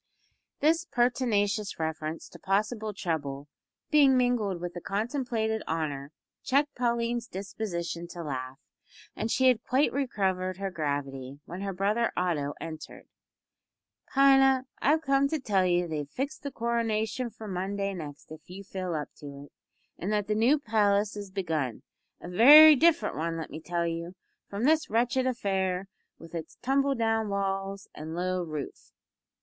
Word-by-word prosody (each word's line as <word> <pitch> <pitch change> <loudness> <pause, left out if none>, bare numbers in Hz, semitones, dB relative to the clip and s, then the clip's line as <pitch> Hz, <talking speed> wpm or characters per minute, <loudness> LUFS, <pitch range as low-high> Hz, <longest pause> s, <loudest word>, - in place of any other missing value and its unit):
This 325 +3 +3
pertinacious 220 - 0
reference 160 0 -4
to - - -13
possible 215 +3 -1
trouble 145 -7 -3 0.4
being 280 -4 +6
mingled 235 -7 +1
with 175 0 -5
the 175 - -7
contemplated 220 - -1
honour 145 -3 -3 0.3
checked 285 +2 +2
Pauline's 235 -1 -1
disposition 180 -4 -5
to 170 0 -7
laugh, 130 -3 -5 0.6
and 220 - -2
she 260 +3 +3
had 245 -3 +3
quite 265 +4 +2
recovered 190 -9 -1
her 195 0 -3
gravity 140 -4 -4
when 180 +3 -7
her 200 0 -2
brother 205 +5 0
Otto 150 -6 -1
entered. 160 -1 -9 1.0
"Pina, 270 -1 +5 0.2
I've 310 +3 +3
come 275 -1 +3
to 315 +2 -2
tell 195 -7 +1
you 175 0 +2
that 175 - -6
they've 150 -2 -4
fixed 275 - -4
the 285 - -4
coronation 235 -1 -1
for 220 -1 -10
Monday 195 +1 -2
next 150 -5 -9
if 155 +1 -12
you 190 +2 -8
feel 185 -3 -4
up 150 -1 -3
to 145 - -10 0.2
it, 145 - -16 0.5
and 190 +5 -2
that 210 -1 +1
the 210 - 0
new 235 +8 +4
palace 210 -5 +1
is 205 -1 -6
begun 160 - -2 0.4
a - - -9
very 295 - +9
different 335 +3 +3
one, 165 +1 -2
let 160 - -6
me 160 - -7
tell 170 +1 -1
you, 170 +2 -4 0.3
from 200 +3 -4
this 310 +3 +3
wretched 245 +3 +1
affair 190 -6 -1 0.3
with 165 0 -13
its 165 -2 -6
tumble 275 +2 +2
down 225 -2 0
walls 195 0 -2
and 160 +2 -7
low 185 +1 -1
roof." 155 -4 -6
200 Hz, 155 wpm, -28 LUFS, 170-240 Hz, 1.0 s, very